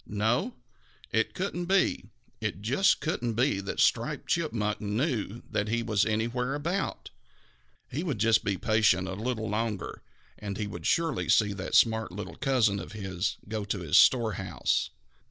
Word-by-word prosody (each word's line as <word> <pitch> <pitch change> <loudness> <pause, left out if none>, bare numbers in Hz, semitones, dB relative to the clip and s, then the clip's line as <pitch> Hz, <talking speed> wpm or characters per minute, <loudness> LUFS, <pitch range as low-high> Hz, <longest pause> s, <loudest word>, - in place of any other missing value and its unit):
No, 110 +5 0 0.6
it 115 0 0
couldn't 180 -2 -2
be, 190 +2 +1 0.3
it 95 - -4
just 140 - +3
couldn't 120 -7 -1
be 120 -3 +2
that 100 0 -5
Striped - - +1
Chipmunk 115 -11 -1
knew 110 - -2
that 105 - -1
he 115 +2 0
was 110 -2 +1
anywhere 120 +4 -1
about. 170 +7 -3 0.8
He 145 - -4
would 160 -8 -2
just 110 +2 +3
be 100 -2 -1
patient 105 -4 +2
a 95 - -4
little 110 +2 -3
longer, 105 -2 -3 0.4
and 100 -2 -5
he 105 - -2
would 85 -5 -5
surely 165 -3 +1
see 105 -2 +4
that 95 -1 -3
smart 110 -3 +4
little 105 +3 -7
cousin 115 -7 +2
of - - -8
his 95 -3 -3
go 110 0 -3
to 100 -2 -3
his 80 -3 -1
storehouse. 115 -6 +2
110 Hz, 155 wpm, -28 LUFS, 105-125 Hz, 0.8 s, see